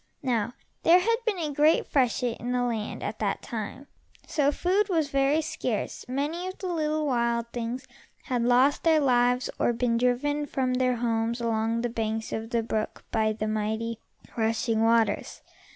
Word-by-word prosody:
Now 240 Hz, -2 st, 0 dB, 0.3 s
there 340 Hz, +2 st, +7 dB
had 460 Hz, +5 st, +2 dB
been 420 Hz, -4 st, +1 dB
a 310 Hz, -4 st, -2 dB
great 300 Hz, +3 st, +4 dB
freshet 250 Hz, -3 st, +1 dB
in 245 Hz, +1 st, -3 dB
the 250 Hz, 0 st, +1 dB
land 225 Hz, -3 st, -3 dB
at 215 Hz, +1 st, -4 dB
that 205 Hz, -2 st, -1 dB
time, 230 Hz, +4 st, -5 dB, 0.4 s
so 290 Hz, -2 st, +1 dB
food 390 Hz, +7 st, +1 dB
was 320 Hz, -6 st, +1 dB
very 275 Hz, +3 st, +3 dB
scarce 300 Hz, -8 st, -3 dB
and 255 Hz, -, -6 dB
many 320 Hz, +6 st, -2 dB
of 370 Hz, -, -6 dB
the -, -, -7 dB
little 310 Hz, -1 st, 0 dB
wild 235 Hz, -3 st, +1 dB
things 240 Hz, +2 st, -4 dB, 0.4 s
had 250 Hz, -3 st, -1 dB
lost 250 Hz, +4 st, +4 dB
their 320 Hz, -2 st, +4 dB
lives, 250 Hz, -2 st, +3 dB
or 240 Hz, -, +2 dB
been 235 Hz, 0 st, +1 dB
driven 290 Hz, +5 st, +1 dB
from 260 Hz, -2 st, -1 dB
their 250 Hz, 0 st, +2 dB
homes 230 Hz, 0 st, -1 dB
along 230 Hz, 0 st, 0 dB
the 240 Hz, -, 0 dB
banks 220 Hz, -1 st, -3 dB
of 220 Hz, 0 st, -4 dB
the 235 Hz, -1 st, 0 dB
brook 220 Hz, -1 st, -3 dB
by 220 Hz, -1 st, +2 dB
the 215 Hz, 0 st, -3 dB
mighty, 220 Hz, +1 st, -2 dB, 0.4 s
rushing 225 Hz, 0 st, +1 dB
waters. 230 Hz, 0 st, +1 dB
245 Hz, 175 wpm, -27 LUFS, 225-290 Hz, 0.4 s, there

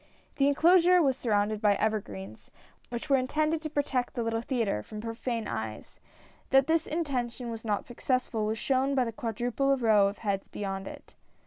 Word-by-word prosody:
The 275 Hz, -, +4 dB
enclosure 350 Hz, +5 st, +5 dB
was 275 Hz, -6 st, +3 dB
surrounded 215 Hz, -3 st, 0 dB
by 205 Hz, -2 st, +4 dB
evergreens, 110 Hz, -, -3 dB, 0.4 s
which 240 Hz, +3 st, -5 dB
were 275 Hz, -2 st, +4 dB
intended 305 Hz, +5 st, 0 dB
to 310 Hz, -, -4 dB
protect 280 Hz, -4 st, -1 dB
the 240 Hz, -, -1 dB
little 225 Hz, 0 st, -1 dB
theatre 230 Hz, -, -1 dB
from 210 Hz, -, -9 dB
profane 230 Hz, 0 st, -3 dB
eyes; 110 Hz, -1 st, -6 dB, 0.5 s
that 270 Hz, 0 st, +5 dB
this 325 Hz, +1 st, +1 dB
intention 250 Hz, -7 st, -2 dB
was 225 Hz, -1 st, -7 dB
not 210 Hz, -3 st, -1 dB
successful, 240 Hz, -3 st, -1 dB
was 220 Hz, +1 st, -1 dB
shown 270 Hz, +3 st, +1 dB
by 260 Hz, -, +3 dB
the 230 Hz, -, -3 dB
quadruple 245 Hz, +5 st, 0 dB
row 215 Hz, -5 st, +4 dB
of 200 Hz, -, -4 dB
heads 200 Hz, -3 st, -2 dB
beyond 195 Hz, -1 st, -5 dB
it. -, -, -11 dB
235 Hz, 175 wpm, -29 LUFS, 210-275 Hz, 0.5 s, enclosure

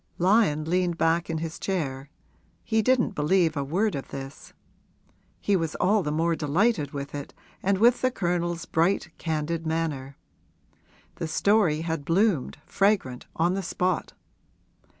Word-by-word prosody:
Lyon 180 Hz, -5 st, +3 dB
leaned 175 Hz, 0 st, +1 dB
back 165 Hz, +1 st, +1 dB
in 165 Hz, -, -1 dB
his 160 Hz, 0 st, -5 dB
chair 140 Hz, -8 st, -3 dB, 0.5 s
he 220 Hz, -1 st, +1 dB
didn't 245 Hz, -1 st, +2 dB
believe 160 Hz, +1 st, +2 dB
a 140 Hz, -, -1 dB
word 190 Hz, +10 st, 0 dB
of 140 Hz, -, -5 dB
this. 135 Hz, +1 st, -9 dB, 0.9 s
He 205 Hz, -, +1 dB
was 165 Hz, -4 st, -1 dB
all 205 Hz, +3 st, +2 dB
the 150 Hz, -, -2 dB
more 165 Hz, +2 st, +1 dB
delighted 160 Hz, -, +1 dB
with 140 Hz, 0 st, -6 dB
it 145 Hz, -1 st, -7 dB, 0.3 s
and 195 Hz, +1 st, +1 dB
with 235 Hz, +4 st, +4 dB
the 255 Hz, -, +3 dB
Colonel's 175 Hz, -5 st, -2 dB
bright, 165 Hz, 0 st, +1 dB
candid 160 Hz, +1 st, -2 dB
manner. 150 Hz, -4 st, -2 dB, 1.0 s
The 165 Hz, -, -3 dB
story 175 Hz, -2 st, +2 dB
had 160 Hz, -3 st, -3 dB
bloomed, 170 Hz, -, +1 dB
fragrant, 195 Hz, -11 st, 0 dB
on 170 Hz, +3 st, +2 dB
the 195 Hz, -, -1 dB
spot. 180 Hz, 0 st, -1 dB
165 Hz, 145 wpm, -26 LUFS, 150-195 Hz, 1.0 s, with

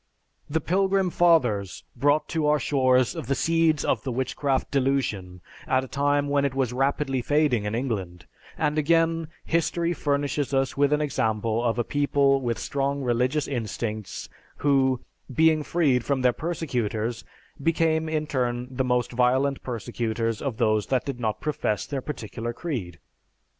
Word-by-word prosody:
The 160 Hz, +2 st, +1 dB
Pilgrim 190 Hz, +2 st, +1 dB
Fathers 125 Hz, -, +2 dB
brought 145 Hz, +4 st, +2 dB
to 160 Hz, -3 st, 0 dB
our 150 Hz, 0 st, +4 dB
shores 130 Hz, -4 st, +2 dB
the 135 Hz, +4 st, -2 dB
seeds 165 Hz, -1 st, +2 dB
of -, -, +1 dB
the 130 Hz, -, -4 dB
Witchcraft 130 Hz, +2 st, -1 dB
Delusion 125 Hz, -10 st, -1 dB, 0.3 s
at 130 Hz, 0 st, +2 dB
a -, -, -7 dB
time 145 Hz, +1 st, +1 dB
when 140 Hz, 0 st, +2 dB
it 140 Hz, -2 st, -1 dB
was 130 Hz, -3 st, 0 dB
rapidly 135 Hz, 0 st, 0 dB
fading 145 Hz, -5 st, +2 dB
in 105 Hz, +2 st, -2 dB
England, 100 Hz, -9 st, -3 dB, 0.3 s
and 150 Hz, 0 st, +1 dB
again 165 Hz, +1 st, +2 dB, 0.2 s
history 170 Hz, +1 st, 0 dB
furnishes 145 Hz, -2 st, -1 dB
us 135 Hz, 0 st, +1 dB
with 140 Hz, 0 st, +2 dB
an 150 Hz, 0 st, +2 dB
example 115 Hz, -5 st, 0 dB
of 115 Hz, -1 st, 0 dB
a 120 Hz, -, +1 dB
people 140 Hz, 0 st, +2 dB
with 120 Hz, -2 st, -1 dB
strong 140 Hz, 0 st, -2 dB
religious 125 Hz, +4 st, +1 dB
instincts 110 Hz, -4 st, -4 dB, 0.3 s
who, 135 Hz, -3 st, +2 dB, 0.3 s
being 160 Hz, +3 st, +4 dB
freed 145 Hz, -6 st, +1 dB
from 140 Hz, 0 st, 0 dB
their 125 Hz, -1 st, +4 dB
persecutors, 120 Hz, -9 st, -2 dB, 0.4 s
became 160 Hz, 0 st, +1 dB
in 155 Hz, -1 st, -1 dB
turn 125 Hz, -4 st, -2 dB
the 130 Hz, +1 st, -1 dB
most 125 Hz, -1 st, 0 dB
violent 130 Hz, +3 st, +2 dB
persecutors 115 Hz, -1 st, -3 dB
of 135 Hz, -6 st, -3 dB
those 110 Hz, -3 st, +1 dB
that 130 Hz, -2 st, 0 dB
did 135 Hz, -3 st, -4 dB
not 110 Hz, -3 st, -1 dB
profess 145 Hz, -8 st, -1 dB
their 140 Hz, -2 st, -4 dB
particular 120 Hz, -4 st, -5 dB
creed. 115 Hz, -, -5 dB
135 Hz, 155 wpm, -25 LUFS, 120-150 Hz, 0.4 s, our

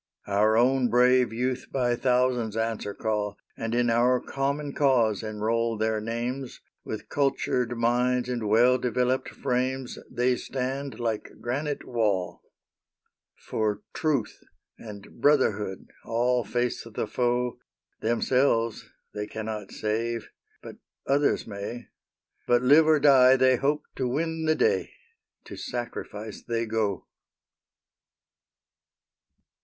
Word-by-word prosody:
Our 105 Hz, +2 st, +3 dB
own 125 Hz, +1 st, +3 dB
brave 125 Hz, -1 st, +4 dB
youth 125 Hz, +2 st, -2 dB
by 125 Hz, -2 st, +1 dB
thousands 125 Hz, -3 st, +1 dB
answer 110 Hz, -2 st, -2 dB
call, 105 Hz, -2 st, -2 dB, 0.2 s
And 115 Hz, +1 st, -3 dB
in 120 Hz, -1 st, +2 dB
our 125 Hz, +2 st, +3 dB
common 140 Hz, +2 st, -2 dB
cause 120 Hz, -7 st, +2 dB
enroll 110 Hz, +1 st, -1 dB
their 110 Hz, 0 st, 0 dB
names; 120 Hz, +4 st, -4 dB, 0.2 s
With -, -, -6 dB
cultured 125 Hz, -3 st, 0 dB
minds 125 Hz, +1 st, +1 dB
and 120 Hz, -4 st, -2 dB
well 120 Hz, +4 st, +5 dB
developed 125 Hz, +2 st, 0 dB
frames 130 Hz, +1 st, -2 dB
They 125 Hz, 0 st, +1 dB
stand 135 Hz, +1 st, -4 dB
like 115 Hz, -3 st, -3 dB
granite 140 Hz, +4 st, -3 dB
wall. 105 Hz, -7 st, -1 dB, 1.1 s
For 105 Hz, -1 st, -1 dB
truth 140 Hz, -9 st, -1 dB, 0.4 s
and 105 Hz, 0 st, -11 dB
brotherhood 105 Hz, -10 st, +1 dB
all 120 Hz, +1 st, +1 dB
face 120 Hz, +3 st, -2 dB
the 115 Hz, -1 st, -4 dB
foe; 120 Hz, +2 st, -1 dB, 0.4 s
Themselves 115 Hz, 0 st, +1 dB, 0.2 s
they 105 Hz, 0 st, -4 dB
cannot 110 Hz, -2 st, -5 dB
save, 115 Hz, +2 st, -2 dB, 0.3 s
but -, -, -10 dB, 0.3 s
others 140 Hz, +1 st, +2 dB
may. 105 Hz, +3 st, -7 dB, 0.6 s
But, 120 Hz, 0 st, +3 dB
live 150 Hz, +5 st, +6 dB
or 155 Hz, -1 st, +5 dB
die, 130 Hz, -3 st, +7 dB
they 130 Hz, 0 st, +4 dB
hope 145 Hz, +4 st, 0 dB
to 130 Hz, -, 0 dB
win 160 Hz, +5 st, -2 dB
the 155 Hz, 0 st, +3 dB
day. 455 Hz, -, +1 dB, 0.5 s
To -, -, -9 dB
sacrifice 110 Hz, -3 st, -6 dB
they 115 Hz, -1 st, -2 dB
go! 110 Hz, -4 st, -1 dB
120 Hz, 115 wpm, -26 LUFS, 110-130 Hz, 1.1 s, die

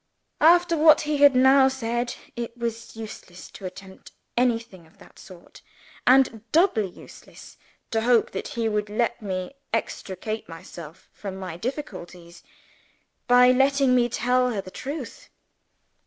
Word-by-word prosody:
After 345 Hz, +2 st, +5 dB
what 310 Hz, 0 st, +6 dB
he 300 Hz, -1 st, -1 dB
had 285 Hz, -2 st, +6 dB
now 265 Hz, +1 st, +6 dB
said, 240 Hz, -2 st, -2 dB, 0.2 s
it 235 Hz, 0 st, -6 dB
was 230 Hz, -1 st, -5 dB
useless 215 Hz, -5 st, -10 dB
to 190 Hz, -, -8 dB
attempt 190 Hz, +1 st, -13 dB, 0.2 s
anything 230 Hz, -8 st, -1 dB
of 160 Hz, -, -26 dB
that -, -, -18 dB
sort 180 Hz, -3 st, -15 dB, 0.5 s
and 255 Hz, -3 st, +4 dB
doubly 315 Hz, -, +3 dB
useless -, -, -15 dB, 0.4 s
to 225 Hz, -2 st, 0 dB
hope 235 Hz, 0 st, +2 dB
that 195 Hz, -, -5 dB
he 230 Hz, -1 st, 0 dB
would 210 Hz, -1 st, -1 dB
let 235 Hz, +2 st, -1 dB
me 185 Hz, +2 st, -4 dB, 0.2 s
extricate 215 Hz, -1 st, -4 dB
myself 165 Hz, 0 st, -11 dB
from 195 Hz, -2 st, -7 dB
my 185 Hz, -3 st, -7 dB
difficulties 180 Hz, -, -7 dB, 0.9 s
by 250 Hz, 0 st, +6 dB
letting 270 Hz, 0 st, +3 dB
me 245 Hz, -1 st, +3 dB
tell 250 Hz, +2 st, +1 dB
her 220 Hz, -5 st, -3 dB
the 185 Hz, -1 st, -8 dB
truth. 280 Hz, +2 st, -7 dB
235 Hz, 140 wpm, -24 LUFS, 195-265 Hz, 0.9 s, what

